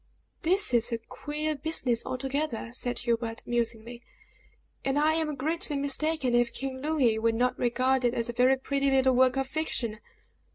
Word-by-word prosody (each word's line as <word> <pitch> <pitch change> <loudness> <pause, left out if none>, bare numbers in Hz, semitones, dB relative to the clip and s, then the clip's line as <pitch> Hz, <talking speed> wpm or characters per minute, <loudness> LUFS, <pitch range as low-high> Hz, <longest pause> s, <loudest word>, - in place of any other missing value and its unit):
"This 370 -3 +2
is 235 -1 +2
a 230 - 0
queer 300 +6 -4
business 275 -5 0
altogether!" 265 -2 -2
said 245 0 -2
Hubert, 230 -1 -2
musingly; 235 0 -2 0.8
"and 270 +1 0
I 305 +2 +4
am 315 -2 -1
greatly 300 +1 -1
mistaken 285 -1 0
if 240 0 +3
King 265 -1 -5
Louis 270 -7 +2
will 225 0 +1
not 250 +2 +1
regard 255 +2 +1
it 240 0 +2
as 230 - 0
a 240 - -4
very 255 +2 +4
pretty 275 +1 0
little 265 -1 +4
work 255 +1 +4
of 270 - +1
fiction." 260 -7 -2
260 Hz, 165 wpm, -28 LUFS, 240-290 Hz, 0.8 s, I